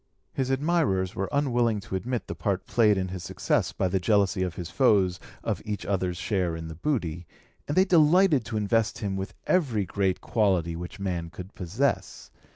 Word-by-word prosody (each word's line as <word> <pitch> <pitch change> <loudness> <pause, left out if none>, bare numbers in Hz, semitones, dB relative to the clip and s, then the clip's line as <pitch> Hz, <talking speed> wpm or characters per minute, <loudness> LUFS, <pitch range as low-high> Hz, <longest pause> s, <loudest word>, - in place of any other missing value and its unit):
His 130 -1 -1
admirers 135 - +1
were 95 +1 -3
unwilling 120 -6 +1
to 95 - -6
admit 120 +5 -2
the - - -5
part 100 -2 -2
played 105 -4 +3
in 95 -1 -1
his 90 -2 -6
success - - 0
by 95 - 0
the 95 +1 0
jealousy 100 0 +2
of 90 -2 -2
his 90 -1 -6
foes 100 -9 +3 0.2
of - - -2
each 105 -1 -4
other's 90 -3 -1
share 90 -4 -1
in 80 0 -6
the - - -6
booty, 85 - -2 0.4
and 145 - -2
they 190 - +6
delighted 170 - +5
to 110 0 -3
invest 110 +1 +1
him 100 -2 -3
with 95 0 -5
every 125 - +1
great 95 0 0
quality 95 -7 +1
which 90 +3 -7
man 90 -4 -3
could 90 +4 -10
possess. 105 +11 -2
100 Hz, 185 wpm, -27 LUFS, 90-120 Hz, 0.4 s, they